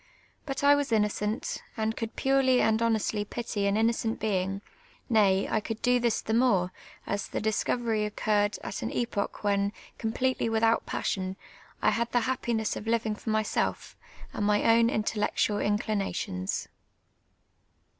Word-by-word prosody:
But 270 - -3
1 285 0 +6
was 285 -3 -2
innocent, 210 0 0 0.2
and 220 0 0
could 225 -1 -5
])urely 265 -1 +3
and 220 0 +2
honestly 220 -2 +1
pity 205 -2 -3
an 200 +1 +1
innocent 225 0 +1
bein;^; 195 -2 -1 0.5
nay, 200 -3 +4
I 220 - +1
could 220 +1 -5
do 245 0 +4
tliis 235 -2 +1
the 220 - -2
more, 225 -7 +3 0.3
as 200 0 -2
the - - -3
iliscover} 220 +1 0
occurred 205 -1 0
at - - -5
an 225 - -2
epoch 220 -4 -2
when, 200 -1 +1 0.3
completely 235 +2 0
without 225 0 +2
passion, 190 -1 -2 0.5
I - - +5
had 235 0 -1
the 245 - +3
happiness 235 -3 -1
of - - -6
liviu!' 225 -1 0
for 220 - -7
mvself 215 0 -1 0.4
and 205 - -1
mv 205 0 +2
own 230 0 +5
intellectual 210 -1 0
inclinations. 200 - -1
220 Hz, 145 wpm, -28 LUFS, 205-230 Hz, 0.5 s, 1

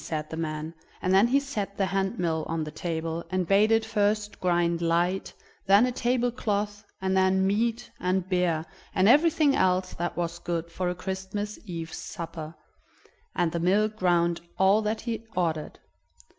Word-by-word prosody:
said 155 -1 -3
the - - -3
man, 155 0 -4 0.3
and 185 - 0
then 195 +4 +6
he 270 +3 +3
set 215 -8 -4
the 195 - +2
hand 195 +3 -1
mill 160 -3 0
on 165 -1 -2
the 150 - -6
table, 165 +1 -3
and 185 0 0
bade 200 +4 +4
it 225 0 +3
first 210 -1 0
grind 170 -1 +1
light, 175 +3 +1 0.4
then 200 +4 +6
a 250 - 0
table 245 0 +1
cloth, 205 -3 -2 0.2
and 190 0 +1
then 190 0 +3
meat, 225 +4 0
and 185 0 0
beer, 180 -4 +1 0.3
and 185 +1 +4
everything 295 +2 +5
else 185 -5 +1
that 175 0 -3
was 170 0 -2
good 170 -1 -3
for 180 +1 -2
a 180 - -2
Christmas 190 +3 -4
Eve's 165 -4 -6
supper; 165 -3 -7 0.8
and 175 -3 +1
the 170 - -2
mill 195 +5 +3
ground 175 -5 +1 0.2
all 195 +3 +4
that 215 +1 -2
he 230 -2 -4
ordered. 160 -4 -1
190 Hz, 170 wpm, -27 LUFS, 170-210 Hz, 0.8 s, then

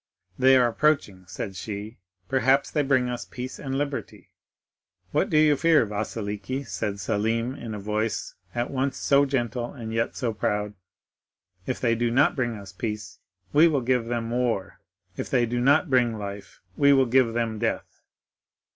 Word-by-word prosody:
'They 130 +1 +6
are 125 -1 +4
approaching,' 115 -8 0
said 95 +3 -6
she; 105 +3 -6 0.3
'perhaps 135 +1 +2
they 150 - +1
bring 130 -3 +2
us 125 -1 -3
peace 125 +1 -7
and 135 -1 -3
liberty!' 145 -1 -4 0.8
"'What - - +1
do 155 - +2
you 155 -1 +5
fear, 160 -3 +4
Vasiliki?' 105 +4 -4
said 100 -1 -3
Selim, 115 +5 0
in 115 -5 -6
a - - -5
voice 105 +1 -2 0.2
at 120 0 -1
once 135 0 -1
so 140 0 +4
gentle 120 -2 -2
and 115 -4 -6
yet 115 +1 -1
so 120 -3 -1
proud. 105 -1 -1 0.9
'If 130 - -2
they 120 -2 +2
do 120 +1 0
not 130 +5 +3
bring 120 -3 -1
us 100 -2 -10
peace, 105 +1 -5 0.3
we 155 +3 +7
will 145 -5 +1
give 125 -1 +1
them 115 -1 -3
war; 120 -5 -1 0.4
if - - -4
they 120 -2 +3
do 120 +1 -2
not 140 +6 +4
bring 120 -3 +3
life, 100 -1 -8
we 140 0 +5
will 135 -1 +4
give 120 -1 +3
them 115 -2 -1
death. 115 0 -3
120 Hz, 170 wpm, -25 LUFS, 110-130 Hz, 0.9 s, we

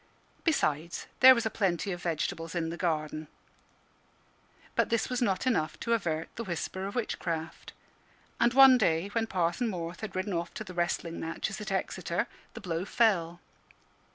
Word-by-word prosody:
Besides, 165 - 0
there 260 +1 +10
was 235 - -1
a 220 - 0
plenty 190 -2 0
of 175 -1 -5
vegetables 165 0 -2
in 165 -1 -1
the - - -4
garden. 155 -3 -2 1.5
But - - +2
this 230 +2 0
was 250 0 -1
not 195 -1 +1
enough 165 -12 0
to 235 - +1
avert 165 -7 -1
the 230 - -3
whisper 190 0 -4
of 200 - -7
witchcraft. 170 -8 -3 0.7
And 235 - +4
one 265 -2 +9
day, 165 +1 +2
when 225 +2 -1
Parson 180 +4 0
Morth 170 -4 -4
had 220 -3 -6
ridden 185 +1 -2
off 170 0 -3
to - - -4
the 185 -3 -9
wrestling 175 -1 -1
matches 180 +6 -4
at 210 - -5
Exeter, 190 - -1 0.3
the - - -7
blow 170 -2 -2
fell. 180 -6 +1
180 Hz, 165 wpm, -30 LUFS, 165-220 Hz, 1.5 s, there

